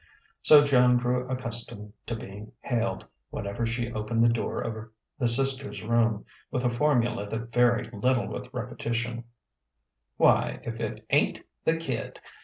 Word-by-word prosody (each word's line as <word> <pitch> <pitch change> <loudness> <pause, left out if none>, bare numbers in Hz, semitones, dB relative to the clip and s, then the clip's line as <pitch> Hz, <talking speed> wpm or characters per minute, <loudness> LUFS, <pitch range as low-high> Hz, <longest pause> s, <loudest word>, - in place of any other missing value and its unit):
So 150 -1 +8
Joan 125 -3 +5
grew 125 +1 -1
accustomed 115 -4 -3
to 115 - -2
being 105 0 -9
hailed, 115 -3 -1 0.2
whenever 100 +4 -3
she 120 0 -3
opened 110 +2 0
the 115 0 +4
door 115 - -2
of 110 -1 -5 0.3
the 120 - +2
sisters' 135 +2 +1
room, 115 -1 +1 0.2
with 125 0 -2
a 120 - +2
formula 120 -5 +1
that 115 +2 -5
varied 120 -1 +2
little 125 +4 +1
with 125 0 -7
repetition: 120 -1 -3 0.9
"Why, - - +3
if - - -5
it - - -5
ain't - - +2 0.2
the 160 - +3
kid! 135 -8 -4
120 Hz, 145 wpm, -27 LUFS, 115-125 Hz, 0.9 s, So